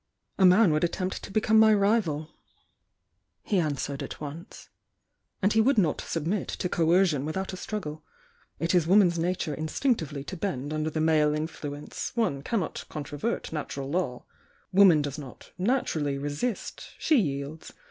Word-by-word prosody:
"A 190 - +7
man 185 0 +6
would 155 +1 +1
attempt 185 +2 -2
to - - -9
become 220 +2 +3
my 220 0 +7
rival," 195 -8 +1 1.1
he 200 - +1
answered 145 -3 -2
at - - -6
once. 155 +6 -9 0.7
"And 200 - +3
he 220 - +5
would 260 +3 +3
not 170 -8 +2
submit 170 +5 -2
to - - -3
coercion 170 -3 +2
without 190 +6 -3
a - - -3
struggle. 180 -6 -5 0.5
It 165 +2 -1
is 175 -3 +3
woman's 180 -3 +5
nature 170 -2 -1
instinctively 155 - -1
to 185 - -6
bend 155 -6 -3
under 155 0 -1
the 155 0 -2
male 155 -2 +3
influence, 150 -2 -5
— - - -35
one 215 - 0
cannot 195 +3 -2
controvert 150 +8 -4
natural 140 -3 -4
law. 145 -8 -2 0.5
Woman 185 -6 +6
does 145 +1 -4
not 135 -4 -11
naturally 170 - 0
resist; 145 - -4
she 310 - +3
yields. 145 -3 -3
165 Hz, 155 wpm, -27 LUFS, 150-195 Hz, 1.1 s, A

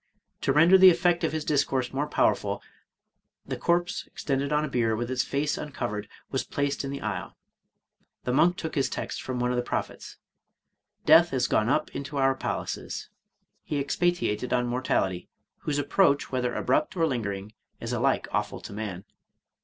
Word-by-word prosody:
To - - +2
render 165 +7 +6
the 190 0 +10
effect 175 0 +2
of 160 - +1
his 155 -1 -3
discourse 135 -4 0
more 145 +2 -1
power - - +3
ful, - - -4 0.9
the - - -3
corse, 175 +1 0
extended 140 0 -2
on 150 0 +2
a - - -3
bier, 115 -4 +1
with 120 +3 -3
its 130 0 +1
face 145 +1 -1
uncovered, 120 -8 -4 0.2
was - - 0
placed 145 0 -2
in 135 - -3
the 140 0 -5
aisle. 100 -5 -4 0.9
The 125 - -1
monk 175 +6 +4
took 160 -3 -4
his 135 -3 +1
text - - -4
from 130 -1 -4
one 125 0 +1
of 125 - -1
the - - +2
prophets, 120 - -4 0.2
— - - -55
" - - -48
Death 165 +1 +6
is 125 -2 +1
gone 110 +2 +2
up 155 +3 +1
into 140 +1 -5
our 135 0 +3
palaces." 130 - -4 0.5
He 150 - -3
expatiated 140 - 0
on 125 -1 +2
mortality, 110 -7 -1 0.3
whose 145 -1 -2
approach, 145 0 +2
whether 125 -2 -1
abrupt 305 -10 0
or 165 - +3
lingering, 105 -7 -3 0.3
is - - -4
alike - - +1
awful - - -2
to - - -9
man. 100 -3 -5
135 Hz, 180 wpm, -27 LUFS, 125-155 Hz, 0.9 s, the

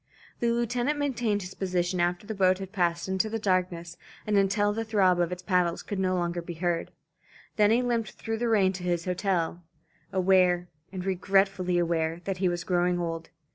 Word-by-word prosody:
The 235 - +1
lieutenant 240 +4 0
maintained 240 -8 0
his 180 +1 -8
position 180 -1 -1
after 175 +2 0
the 220 - -4
boat 185 -2 +3
had 190 -1 -7
passed 170 -2 0
into 190 +3 0
the 225 - -2
darkness 180 -4 -1 0.3
and 210 - 0
until 205 +1 +2
the 225 +1 -2
throb 195 -5 +3
of 175 0 +1
its 180 0 -5
paddles 180 -3 +1
could 205 - -4
no 185 -1 +1
longer 175 -1 -1
be 170 0 -7
heard. 170 0 -1 0.7
Then 210 -1 +4
he 235 +3 +3
limped 235 -4 -1
through 225 -1 -4
the 240 - 0
rain 195 -4 +3
to 180 -1 -7
his 175 -1 -1
hotel, 180 -2 -1 0.5
aware, 180 -2 +3 0.2
and 185 -1 -5
regretfully 195 -1 +1
aware, 165 -1 0
that 195 0 -3
he 185 -1 +1
was 175 0 -3
growing 180 0 +1
old. 165 -1 -4
185 Hz, 190 wpm, -27 LUFS, 175-205 Hz, 0.7 s, Then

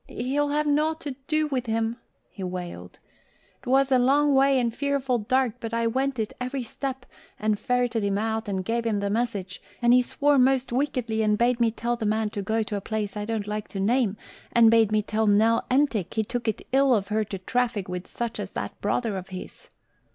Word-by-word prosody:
"He'll 280 +4 -1
have 300 +1 +1
nought 305 +2 +1
to 290 - -4 0.2
do 310 0 +2
with 260 -5 -2
him," 225 +1 -1 0.3
he 195 - -8
wailed. 175 - -6 0.6
"'Twas 270 +2 +2
a 260 - +5
long 285 +3 +3
way 270 0 +4
and 235 -2 0
fearful 275 -3 0
dark 255 +2 +1
but 230 -1 -4
I 230 0 +1
went 265 +3 0
it, 220 -2 -2
every 255 +1 -3
step, 260 +2 -5 0.3
and 215 -1 0
ferreted 245 -3 0
him 200 0 0
out 220 +1 -2
and 190 -2 -2
gave 235 +2 0
him 220 -3 0
the 200 0 -1
message; 205 -5 -2 0.2
and 240 0 +4
he 250 - +6
swore 285 +3 +2
most 260 -1 +3
wickedly 245 -4 -1
and 210 -1 +2
bade 240 +1 +2
me 235 -1 +4
tell 235 +2 -2
the 220 -2 -2
man 215 0 +1
go 215 +2 -1
to 210 - -5
a 200 - -3
place 215 0 -3
I 205 0 -3
don't 220 -2 -2
like 210 0 -4
to 195 - -6
name, 215 0 +1 0.3
and 230 -1 +6
bade 225 -2 +4
me 215 -1 +2
tell 215 +1 0
Nell 220 +3 +3
Entick 255 - +1
he 220 - +2
took 240 +2 -4
it 220 - -2
ill 270 -1 +4
of 200 -2 -2
her 215 +1 +1
to 200 -1 -5
traffic 225 +1 -1
with 180 0 -5
such 235 -2 -4
as 200 -2 -4
that 100 - -5
brother 210 0 0
of 190 +1 -7
his." 185 -1 -9
230 Hz, 215 wpm, -26 LUFS, 210-255 Hz, 0.6 s, he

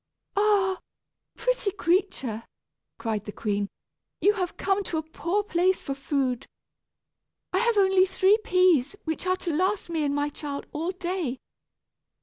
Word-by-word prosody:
"Ah! 400 -2 +3 0.6
pretty - - 0
creature," 345 - 0 0.6
cried 220 -3 -2
the 210 - -5
queen, 205 -1 -2 0.5
"you 410 - +4
have 365 -4 -3
come 395 +1 +1
to 325 - -2
a 315 - -1
poor 340 +5 -1
place 370 -1 +1
for 275 - -2
food. 270 -2 -1 1.1
I 375 - +3
have 470 0 +2
only 385 -1 +5
three 385 +3 +4
peas, 365 - +3
which 320 +3 -3
are 370 - +3
to 350 -3 -3
last 370 +2 0
me 320 -2 0
and 285 -1 0
my 290 0 0
child 285 -1 -5
all 320 +4 -2
day. 360 -7 -2
360 Hz, 145 wpm, -26 LUFS, 290-385 Hz, 1.1 s, only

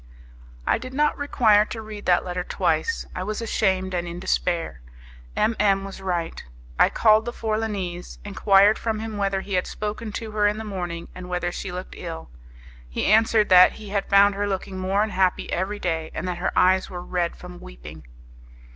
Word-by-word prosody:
I - - +2
did 255 +2 -8
not 300 +1 +2
require 225 -7 +3
to 225 - -7
read 215 -1 -8
that 180 0 +3
letter 180 0 -3
twice; 460 - -1
I - - -4
was 210 +3 -3
ashamed 190 -4 0
and 175 -1 -2
in 170 +1 -6
despair. 170 - -1 0.5
M 225 - +1
M 195 -2 +3
was 195 0 -9
right. 175 -3 -3 0.4
I - - +6
called 220 0 +4
the 240 - -3
Forlanese, 210 -6 -3
enquired 200 +1 +4
from 225 -1 -2
him 220 -1 -5
whether 195 -1 0
he 200 - -7
had 180 0 +1
spoken 215 +1 -5
to 220 -1 -5
her 210 -1 +2
in 210 +1 0
the 220 - -5
morning, 175 -5 -5
and 180 0 -9
whether 180 0 -1
she 195 - -5
looked 180 +1 -7
ill. 80 -6 -7 0.6
He - - -2
answered 220 -1 +4
that 185 -1 +8
he 215 -2 -10
had 200 -1 -2
found 200 0 +6
her 205 +1 -2
looking 190 -1 -4
more 195 +2 +1
unhappy 190 -4 0
every 190 +4 -1
day, 165 -4 -2
and - - -3
that 180 -1 -3
her 180 - -1
eyes 185 +1 +4
were 175 -1 -6
red 175 -2 -2
from 180 0 -11
weeping. 75 +6 -11
195 Hz, 190 wpm, -24 LUFS, 180-215 Hz, 0.6 s, that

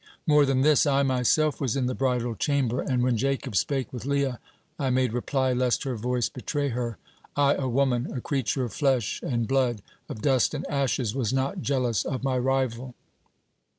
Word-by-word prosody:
More 150 -2 +5
than 135 -1 +2
this, 150 +1 +4
I 140 0 +3
myself 130 +3 +2
was 130 -4 0
in 135 -2 0
the 130 - -1
bridal 125 -3 0
chamber, 130 0 0
and 125 -2 0
when 125 -2 +2
Jacob 135 -1 -1
spake 135 +6 0
with 120 -4 -6
Leah, 140 -2 0 0.4
I 135 -2 0
made 130 -2 +1
reply, 130 +1 0
lest 125 -1 +1
her 130 -3 -2
voice 120 +1 -1
betray 145 +2 -3
her. 120 -3 -3 0.4
I, 145 0 +4
a 130 -2 -2
woman, 125 -1 +1
a 125 - -4
creature 135 0 -1
of 120 - -4
flesh 135 -8 0
and 120 -3 -1
blood, 125 -6 +1 0.3
of 110 - -7
dust 135 +1 +2
and 145 - -4
ashes, 135 -5 0
was 125 -6 -1
not 135 +8 -1
jealous 125 -7 0
of 130 - -4
my 130 -2 +1
rival. 130 -1 -1
130 Hz, 185 wpm, -26 LUFS, 125-140 Hz, 0.4 s, More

